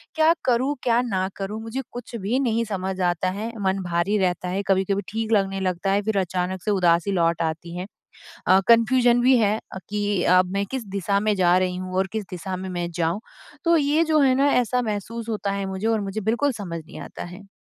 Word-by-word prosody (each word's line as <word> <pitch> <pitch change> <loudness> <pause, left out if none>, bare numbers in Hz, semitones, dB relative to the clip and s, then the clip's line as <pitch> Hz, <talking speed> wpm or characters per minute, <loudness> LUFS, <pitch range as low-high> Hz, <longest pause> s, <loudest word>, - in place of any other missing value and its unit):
क्या 320 +1 +5
करूँ, 260 +3 +2
क्या 240 0 +3
ना 190 -6 -1
करूँ? 205 +3 -4
मुझे 235 +4 -4
कुछ 245 -1 -8
भी 225 +5 -1
नहीं 230 -3 +1
समझ 190 -2 -3
आता 175 +1 +1
है 225 +2 -3
मन 190 0 0
भारी 175 +4 0
रहता 180 -1 0
है, 195 +2 -2
कभी-कभी 195 +1 +1
ठीक 225 +1 -3
लगने 195 -2 +2
लगता 185 +1 -1
है 200 +1 +2
फिर 215 -1 -1
अचानक 185 0 -2
से 210 - 0
उदासी 175 0 +2
लौट 170 -2 +1
आती 165 +2 -3
हैं। 185 +2 -5 0.6
अ, 190 +1 +6
कन्फ्यूज़न 240 +1 +5
भी 255 0 +5
है 215 -1 +2 0.2
अ, - - -5
कि 205 -3 0
अब 185 0 +4
मैं 200 0 0
किस 260 -4 -3
दिशा 200 +1 +1
में 210 0 +1
जा 180 -1 +4
रही 185 -1 0
हूँ 185 0 -6
और 190 0 +2
किस 215 -3 -3
दिशा 185 +1 -4
में 190 0 -6
मैं 175 -1 -3
जाऊँ? 170 +3 -1 0.5
तो 335 0 +5
ये 295 +3 +3
जो 310 -1 +2
है 265 -2 +4
ना 280 +2 +3
ऐसा 250 0 +2
महसूस 225 +1 -4
होता 205 -2 -2
है 200 0 -2
मुझे 190 +3 -3
और 220 -2 +1
मुझे 200 +2 -4
बिल्कुल 240 +7 +1
समझ 180 -7 -6
नहीं - - -11
आता - - -8
है। 185 +3 -11
200 Hz, 220 wpm, -24 LUFS, 185-230 Hz, 0.6 s, अ